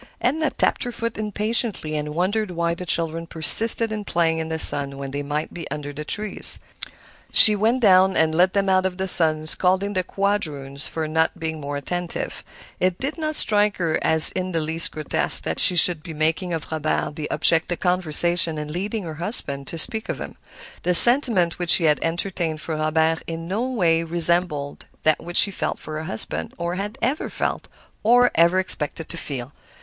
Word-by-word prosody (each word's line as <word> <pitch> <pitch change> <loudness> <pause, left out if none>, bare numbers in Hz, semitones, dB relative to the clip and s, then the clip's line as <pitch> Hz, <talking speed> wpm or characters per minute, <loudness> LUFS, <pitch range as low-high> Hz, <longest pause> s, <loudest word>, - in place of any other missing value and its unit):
Edna 310 +5 -1
tapped - - -1
her 245 - -5
foot 230 -1 -5
impatiently, 210 -5 -1
and 150 0 -5
wondered 200 +4 -2
why 170 -1 -2
the 180 +1 -9
children 165 0 -2
persisted 220 +9 +1
in 215 -1 -5
playing 165 -4 -1
in 160 0 -5
the 160 - -3
sun 140 -3 +1
when 140 -1 -7
they 145 +1 -5
might 150 +2 -5
be 170 - -9
under 145 0 -7
the 150 +2 -7
trees. 210 +6 +2 0.7
She 215 - +9
went 225 +5 0
down 190 -2 +3
and 160 0 +1
led 180 +3 +2
them 200 -1 -1
out 190 0 +1
of 180 -1 -9
the 190 0 -3
sun, 155 -3 0
scolding 190 +5 -1
the 185 -1 -2
quadroon 160 -9 -4
for 155 +1 -3
not 160 +1 -1
being 160 -1 -5
more 145 0 -5
attentive. 175 +4 -6 0.4
It 185 -1 -1
did 285 +5 -6
not 310 -1 -3
strike 210 -4 +2
her 165 -3 -2
as 160 -1 +9
in 185 -1 -5
the 165 - -1
least 160 +1 +2
grotesque 155 -1 +2
that - - -4
she 180 - +6
should 175 -2 +4
be 165 -1 -10
making 160 +4 -2
of 165 -1 -6
Robert 155 -1 -3
the 150 -1 -6
object 165 +1 0
of 175 - -4
conversation 175 -2 +2
and 150 0 -7
leading 200 +5 -5
her 160 -2 -7
husband 140 - -3
to 165 - -5
speak 220 +7 +2
of - - -4
him. - - -9 0.5
The 180 0 0
sentiment 230 -8 +6
which 175 -1 -4
she 165 0 +4
entertained 165 +1 -2
for 160 +1 -5
Robert 160 +1 -1
in 165 0 -7
no 220 +8 -3
way 170 -9 0
resembled 165 -3 -2 0.2
that 155 -1 0
which 175 +1 -3
she 200 - +4
felt - - -4
for 155 -1 -8
her 155 - -7
husband, 80 - -4
or 170 +1 -4
had 200 +3 -6
ever 265 +6 -2
felt, - - -4 0.3
or 245 +3 +3
ever 170 +3 +2
expected 165 -4 -2
to 170 - -7
feel. 135 -4 -7
170 Hz, 195 wpm, -21 LUFS, 155-195 Hz, 0.7 s, She